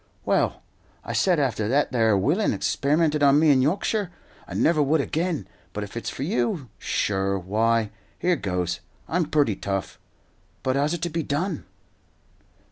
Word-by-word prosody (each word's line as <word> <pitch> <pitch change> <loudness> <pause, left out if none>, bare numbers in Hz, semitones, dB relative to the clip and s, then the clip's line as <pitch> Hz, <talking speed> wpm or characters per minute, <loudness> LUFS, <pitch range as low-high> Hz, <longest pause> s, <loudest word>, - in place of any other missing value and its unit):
"Well, - - +1 0.4
I - - -4
said 180 -4 +3
after 115 -7 0
that 135 +3 +1
'ere 110 -4 +3
willain 160 - +2
experimented 150 +1 +1
on 140 0 +6
me 155 -1 +5
in 130 -2 +4
Yorkshire, 195 - 0 0.4
I - - -7
never 160 -2 +3
would 150 +3 +3
again; 160 +3 -1 0.3
but - - -3
if - - -9
it's - - -3
for - - -5
you, 125 +2 -1
sur 95 -1 0
why, 110 +3 +1 0.3
here 180 0 +2
goes; 90 - -2 0.3
I'm 165 -2 0
purty 145 -9 +2
tough. 95 -1 -4 0.6
But 130 0 +1
how's 145 +4 +1
it 170 - -6
to 175 - 0
be 165 +1 -1
done?" 155 +3 -2
140 Hz, 160 wpm, -25 LUFS, 110-160 Hz, 0.6 s, on